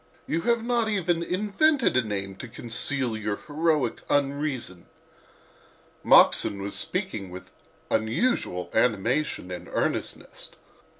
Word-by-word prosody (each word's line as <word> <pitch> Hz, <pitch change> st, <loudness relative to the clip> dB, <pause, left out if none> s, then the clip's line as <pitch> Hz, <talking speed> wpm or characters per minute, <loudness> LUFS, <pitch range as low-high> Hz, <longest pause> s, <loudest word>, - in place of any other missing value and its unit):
You 165 Hz, -, -1 dB
have 235 Hz, -1 st, +2 dB
not 235 Hz, -2 st, +1 dB
even 175 Hz, -5 st, 0 dB
invented 210 Hz, -, +1 dB
a 130 Hz, -, +5 dB
name 100 Hz, -3 st, -4 dB
to 125 Hz, -, -8 dB
conceal 120 Hz, +1 st, -1 dB
your 105 Hz, -1 st, -2 dB
heroic 150 Hz, -5 st, 0 dB
unreason." 140 Hz, -, -1 dB, 1.2 s
Moxon 100 Hz, -, +5 dB
was 100 Hz, -, -4 dB
speaking 180 Hz, -, -2 dB
with 90 Hz, 0 st, -10 dB, 0.4 s
unusual 110 Hz, -, 0 dB
animation 115 Hz, -1 st, 0 dB
and 90 Hz, -, -7 dB
earnestness. -, -, -3 dB
135 Hz, 110 wpm, -26 LUFS, 110-180 Hz, 1.2 s, a